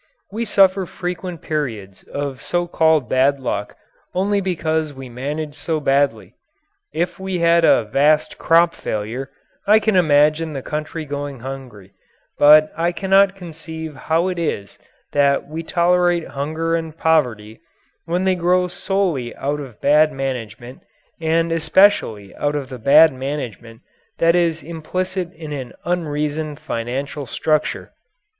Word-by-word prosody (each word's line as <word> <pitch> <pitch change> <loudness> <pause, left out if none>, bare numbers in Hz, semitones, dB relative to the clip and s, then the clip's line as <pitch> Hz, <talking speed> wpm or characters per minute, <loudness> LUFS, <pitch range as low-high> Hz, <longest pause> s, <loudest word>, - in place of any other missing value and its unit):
We 225 +3 -3
suffer 195 -3 +3
frequent 180 -1 -5
periods 115 -11 -4
of 140 -2 -5
so 175 +4 -1
called 160 -5 +2
bad 135 +2 +2
luck 130 - -3 0.4
only 200 +2 +1
because 160 -5 -1
we 130 -1 -9
manage 145 +5 -4
so 155 +1 -2
badly. 140 -5 0 0.6
If 175 +2 -2
we 190 -1 -3
had 170 0 +3
a 120 - +5
vast 145 +8 +1
crop 170 +1 +4
failure, 115 +6 -4 0.4
I 210 +2 +7
can 220 -1 +1
imagine 155 -1 +3
the 135 -2 -5
country 155 +1 -4
going 145 -3 -5
hungry, 125 -7 -9 0.5
but 155 +1 +7
I 170 +2 0
cannot 195 +2 +3
conceive 160 -3 -8
how 165 +5 0
it 180 -2 -3
is 100 -11 -3 0.3
that 140 -1 +2
we 160 +2 -5
tolerate 175 0 +1
hunger 160 +4 -2
and 160 -1 -4
poverty, 120 -11 0 0.5
when 175 +2 -1
they 190 0 +3
grow 180 +1 +2
solely 180 -8 -2
out 145 +2 -2
of 130 -7 -9
bad 155 +2 +4
management, 125 -3 -5 0.4
and 165 +1 +1
especially 160 - +2
out 145 0 -1
of 140 -3 -4
the 130 -2 -8
bad 150 +6 +6
management 130 -4 -6 0.4
that 165 0 +4
is 170 -2 +1
implicit 180 +3 -4
in 155 -2 -8
an 130 -4 -6
unreasoned 150 -3 -2
financial 130 +4 -4
structure. 155 +4 -1
155 Hz, 135 wpm, -20 LUFS, 135-170 Hz, 0.6 s, I